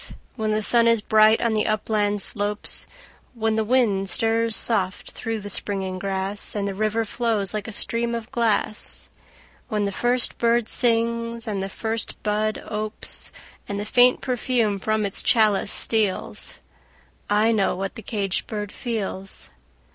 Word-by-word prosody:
When 220 -3 -2
the 215 0 +1
sun 235 +2 +4
is 230 -1 +4
bright 215 +1 +4
on 230 -1 +1
the 215 - 0
upland 210 -1 +1
slopes; 205 0 0 0.5
When 225 -1 0
the 220 0 +1
wind 210 -5 +1
stirs 225 +1 +2
soft 195 -5 +1
through 225 -2 -4
the 205 - -7
springing 190 -1 -1
grass, 195 +2 0
And 200 -1 -1
the 200 - -3
river 215 +3 -1
flows 220 -3 -1
like 210 -2 -4
a - - -5
stream 235 +2 +1
of 230 0 -7
glass; 225 -3 -1 0.6
When 210 -3 -1
the 200 - -1
first 245 +4 0
bird 235 -1 +2
sings 230 0 +1
and 200 -3 -2
the 195 - -4
first 225 +3 -4
bud 215 +1 -1
opes, 215 0 -4 0.4
And 200 0 -3
the 205 - -4
faint 245 +3 +4
perfume 240 -5 0
from 215 +1 0
its 195 - +2
chalice 210 -3 +3
steals 215 -4 +1 0.7
I 210 +2 +3
know 205 -5 +1
what 195 +1 -4
the - - -9
caged 200 -5 -2
bird 210 -2 -5
feels! 200 -5 -5
215 Hz, 155 wpm, -23 LUFS, 205-230 Hz, 0.7 s, sun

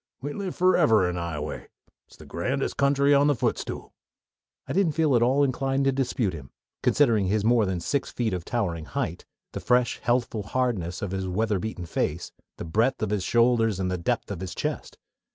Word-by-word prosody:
We 145 +2 -5
live 195 -3 -4
forever 155 - +4
in 90 - -2
Ioway. 85 -4 -4 0.4
It's - - -19
the - - -13
grandest - - -2
country 140 0 +3
on 140 +1 +5
the 145 - +3
footstool." - - -3 0.7
I - - -4
didn't 185 -4 +2
feel 155 -4 +2
at 120 - +3
all 130 +4 +3
inclined 135 0 0
to 135 - +4
dispute 125 -6 -1
him, 70 -5 -9 0.3
considering 115 -9 +3
his 105 +2 0
more 115 -3 +4
than 95 -2 -1
six 140 +10 -1
feet 115 -4 -2
of 90 -2 -3
towering 85 -8 -2
height, - - -4 0.2
the - - -5
fresh, 125 -1 +1
healthful 120 -2 0
hardness 100 -6 -2
of 100 - -3
his 95 -1 -3
weather 105 +2 0
beaten 100 -3 -5
face, 85 0 -2 0.3
the - - -6
breadth 110 +9 +1
of 105 - -1
his 105 -3 0
shoulders, 115 -2 +2
and 90 -2 -2
depth 120 +1 -1
of 95 - -4
his 95 -2 -6
chest. - - -4
115 Hz, 190 wpm, -26 LUFS, 95-135 Hz, 0.7 s, on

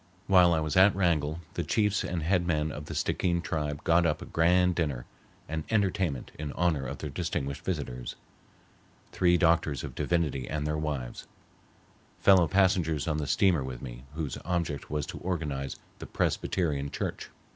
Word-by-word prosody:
While 90 -2 +6
I 80 - +3
was 75 -1 -2
at 95 +1 +6
Wrangell 85 -4 +1
the - - -2
chiefs 105 -2 +1
and 85 -3 -3
head 85 +1 +1
men 75 -2 0
of 75 0 -7
the - - -6
Stickeen 85 -1 0
tribe 75 -6 -3
got 85 +1 +4
up 75 -2 +1
a - - -8
grand 90 +2 +3
dinner 75 -8 -2 0.4
and 80 0 -3
entertainment 95 - 0
in 75 -2 -4
honor 80 -6 0
of - - -5
their 75 - -5
distinguished 70 -3 -3
visitors, 65 -9 -4 1.0
three 90 -1 +3
doctors 80 -5 +2
of - - -6
divinity 75 -7 -1
and 75 -1 -2
their 75 0 0
wives, 75 -6 -4 0.9
fellow 95 -4 +6
passengers 90 -5 +2
on 75 -2 0
the 75 -2 -2
steamer 90 -3 +3
with 65 -1 -7
me, - - -8
whose 75 -5 -3
object 85 -4 -2
was 75 -1 -1
to - - -7
organize 75 -7 -3 0.2
the - - -7
Presbyterian 75 -6 -1
church. - - -4
80 Hz, 170 wpm, -29 LUFS, 75-90 Hz, 1.0 s, While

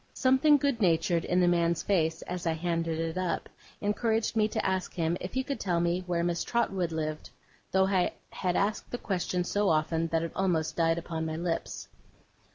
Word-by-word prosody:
Something 265 +3 +5
good 280 -4 0
natured 170 -1 +2
in 180 - +2
the 175 - +4
man's 170 -2 +2
face, 160 -4 +1
as 180 -1 -4
I 165 - +2
handed 165 -1 -1
it 165 +2 -2
up, 180 -3 -2 0.3
encouraged 220 +2 0
me 215 -1 +3
to - - -2
ask 190 -1 -1
him 165 -1 0
if 180 - -5
he 260 - +1
could 280 0 -4
tell 175 -3 0
me 175 +2 0
where 170 -1 0
Miss 170 -1 0
Trotwood 195 -7 0
lived; 155 -1 -3 0.4
though 190 0 +4
I 190 -2 +1 0.2
had 180 -2 -1
asked 205 +2 0
the 245 - -3
question 180 -4 -1
so 205 +3 +1
often, 160 +1 +1
that 165 0 0
it 165 - -3
almost 175 -5 0
died 165 -1 +2
upon 160 -1 -3
my 160 - -3
lips. 170 0 -3
175 Hz, 195 wpm, -29 LUFS, 165-195 Hz, 0.4 s, Something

